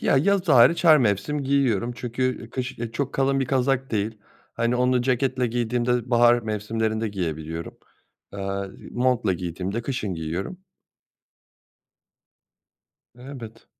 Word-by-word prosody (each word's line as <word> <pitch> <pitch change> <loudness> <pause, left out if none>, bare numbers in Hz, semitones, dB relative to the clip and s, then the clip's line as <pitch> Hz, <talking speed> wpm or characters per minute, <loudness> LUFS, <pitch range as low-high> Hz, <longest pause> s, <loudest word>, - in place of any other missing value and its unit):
Ya, - - +2
yaz 195 +5 +2
hariç, 130 +6 +6
her 155 -2 +8
mevsim 120 +5 0
giyiyorum 125 -5 +1
çünkü 125 +1 -3
kış, 130 0 -4
eee, 115 -1 -4
çok 140 +2 -2
kalın 135 -1 +2
bir - - +1
kazak 135 0 0
değil, 110 0 -2 0.4
hani, 115 +1 0
onu 125 0 +2
ceketle 130 0 +1
giydiğimde 120 +1 -1
bahar 120 0 +5
mevsimlerinde 110 +1 -2
giyebiliyorum, 80 -4 -5 0.5
eee, 100 0 -3 0.2
montla 120 -5 +1
giydiğimde 90 +5 -4
kışın 110 -7 -3
giyiyorum. 85 - -5 2.5
Evet. 125 -4 -10
120 Hz, 115 wpm, -24 LUFS, 105-130 Hz, 2.5 s, her